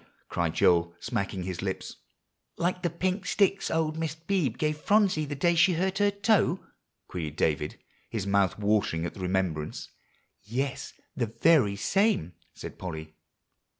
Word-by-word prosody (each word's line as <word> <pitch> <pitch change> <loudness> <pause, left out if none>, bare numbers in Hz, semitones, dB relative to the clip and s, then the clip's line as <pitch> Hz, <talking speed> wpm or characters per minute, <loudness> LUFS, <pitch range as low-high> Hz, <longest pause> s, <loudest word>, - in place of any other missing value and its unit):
cried 85 -1 -1
Joel, 85 -1 +3
smacking 95 -2 -2
his 90 -1 -4
lips. 95 -1 -4 0.6
"Like 180 +1 0
the 175 - +1
pink 185 +4 -2
sticks 195 -1 +2
old 160 -1 0
Mrs. 160 0 -4
Beebe 160 - 0
gave 150 0 -1
Phronsie 200 -5 +3
the 145 0 -4
day 170 +5 +3
she 180 +2 +5
hurt 190 +3 0
her 205 0 +4
toe?" 200 -2 +2 0.5
queried 80 -4 -5
David, 75 -2 0 0.3
his 105 -4 -3
mouth 100 -2 +2
watering 100 -5 +1
at - - -4
the - - -12
remembrance. 90 -5 -2 0.5
"Yes, 130 +6 -3 0.2
the 120 -5 0
very 115 -2 +3
same," 150 - +1 0.2
said - - -9
Polly. 80 -4 -6
135 Hz, 150 wpm, -28 LUFS, -, 0.6 s, she